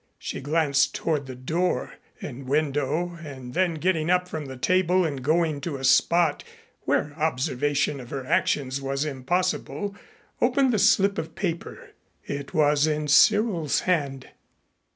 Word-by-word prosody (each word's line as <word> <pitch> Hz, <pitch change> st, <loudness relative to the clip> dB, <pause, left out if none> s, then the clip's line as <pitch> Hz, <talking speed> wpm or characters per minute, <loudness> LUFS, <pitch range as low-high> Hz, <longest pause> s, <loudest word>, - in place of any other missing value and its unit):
She -, -, -6 dB
glanced 145 Hz, -1 st, +1 dB
toward 150 Hz, -4 st, -1 dB
the 130 Hz, -, -7 dB
door 160 Hz, +8 st, -1 dB, 0.3 s
and 130 Hz, +2 st, -8 dB
window 150 Hz, +4 st, -1 dB
and 130 Hz, -4 st, -9 dB
then 180 Hz, 0 st, +1 dB
getting 165 Hz, 0 st, 0 dB
up 180 Hz, 0 st, +2 dB
from 155 Hz, -5 st, -5 dB
the 130 Hz, -1 st, -8 dB
table 185 Hz, +5 st, +2 dB
and 140 Hz, -4 st, -3 dB
going 155 Hz, 0 st, +1 dB
to 150 Hz, -3 st, -4 dB
a 135 Hz, -, -9 dB
spot 160 Hz, +4 st, +3 dB, 0.4 s
where 145 Hz, 0 st, 0 dB
observation 145 Hz, -1 st, 0 dB
of 120 Hz, -2 st, -10 dB
her 135 Hz, -2 st, -5 dB
actions 135 Hz, 0 st, 0 dB
was 135 Hz, +2 st, -2 dB
impossible, 180 Hz, +8 st, -2 dB, 0.5 s
opened 255 Hz, +1 st, +3 dB
the 215 Hz, -, +2 dB
slip 200 Hz, +1 st, +3 dB
of 160 Hz, -, -6 dB
paper. 170 Hz, -2 st, -5 dB, 0.3 s
It 140 Hz, -1 st, -5 dB
was 150 Hz, -2 st, +3 dB
in 150 Hz, -1 st, -1 dB
Cyril's 185 Hz, 0 st, +4 dB
hand. 140 Hz, -7 st, -1 dB
150 Hz, 145 wpm, -25 LUFS, 140-175 Hz, 0.5 s, Cyril's